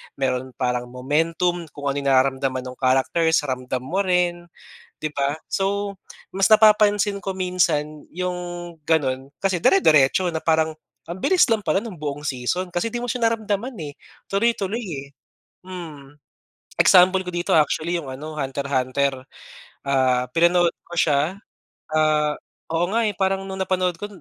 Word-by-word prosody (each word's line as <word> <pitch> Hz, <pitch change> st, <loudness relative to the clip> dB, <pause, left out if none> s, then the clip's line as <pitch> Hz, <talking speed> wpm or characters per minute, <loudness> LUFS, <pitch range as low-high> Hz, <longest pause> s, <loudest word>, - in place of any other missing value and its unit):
meron 130 Hz, -1 st, -2 dB
parang 125 Hz, -1 st, -1 dB
momentum, 165 Hz, +7 st, -1 dB
kung 145 Hz, -1 st, -2 dB
ano 135 Hz, -, -4 dB
yung 140 Hz, -, -4 dB
nararamdaman 130 Hz, 0 st, +1 dB
nung 125 Hz, 0 st, -9 dB
characters, 145 Hz, +5 st, +2 dB
ramdam 130 Hz, -2 st, -3 dB
mo 175 Hz, +9 st, -2 dB
rin, 180 Hz, -2 st, 0 dB, 0.5 s
di -, -, -4 dB
ba? 140 Hz, +2 st, -1 dB
So 200 Hz, +1 st, -1 dB, 0.4 s
mas 195 Hz, +1 st, +2 dB
napapansin 210 Hz, -2 st, +4 dB
ko 195 Hz, -, -3 dB
minsan, 160 Hz, -5 st, -1 dB
yung 180 Hz, +1 st, -3 dB, 0.5 s
ganun 135 Hz, -4 st, 0 dB
kasi 190 Hz, -3 st, -1 dB
dire-diretso 165 Hz, -1 st, +4 dB
na, 160 Hz, -, -3 dB
parang 160 Hz, -1 st, +1 dB, 0.3 s
ang 170 Hz, +2 st, -6 dB
bilis 370 Hz, -1 st, +4 dB
lang 225 Hz, -2 st, +1 dB
pala 195 Hz, -, +1 dB
nung 225 Hz, -4 st, -7 dB
buong 145 Hz, 0 st, -5 dB
season, 145 Hz, +8 st, -2 dB
kasi 175 Hz, +6 st, -1 dB
di 240 Hz, -, -3 dB
mo 245 Hz, -, -4 dB
siya 235 Hz, -1 st, +1 dB
naramdaman 225 Hz, +2 st, -2 dB
eh, 145 Hz, -1 st, -7 dB, 0.4 s
tuloy-tuloy 220 Hz, +1 st, 0 dB
eh. 140 Hz, -9 st, -6 dB, 0.6 s
Mm, 155 Hz, -7 st, -9 dB, 0.7 s
example 185 Hz, +1 st, +6 dB
ko 180 Hz, -, -6 dB
dito 175 Hz, 0 st, -1 dB
actually 155 Hz, +2 st, +2 dB
yung 145 Hz, -5 st, -7 dB
ano, 150 Hz, +4 st, -7 dB
Hunter 140 Hz, -1 st, -3 dB
Hunter, 135 Hz, 0 st, 0 dB, 0.6 s
ah, 130 Hz, -2 st, +2 dB
pinanood 170 Hz, +2 st, +3 dB, 0.2 s
ko 175 Hz, -, -8 dB
siya, 155 Hz, +1 st, +2 dB, 0.6 s
ah 155 Hz, -1 st, +2 dB, 0.3 s
oo 165 Hz, +2 st, +1 dB
nga 230 Hz, -, +2 dB
eh, 210 Hz, -, 0 dB
parang 195 Hz, 0 st, +1 dB
nung 190 Hz, 0 st, -6 dB
napanood 185 Hz, -2 st, 0 dB
ko, 205 Hz, -, -5 dB
165 Hz, 150 wpm, -22 LUFS, 140-190 Hz, 0.7 s, example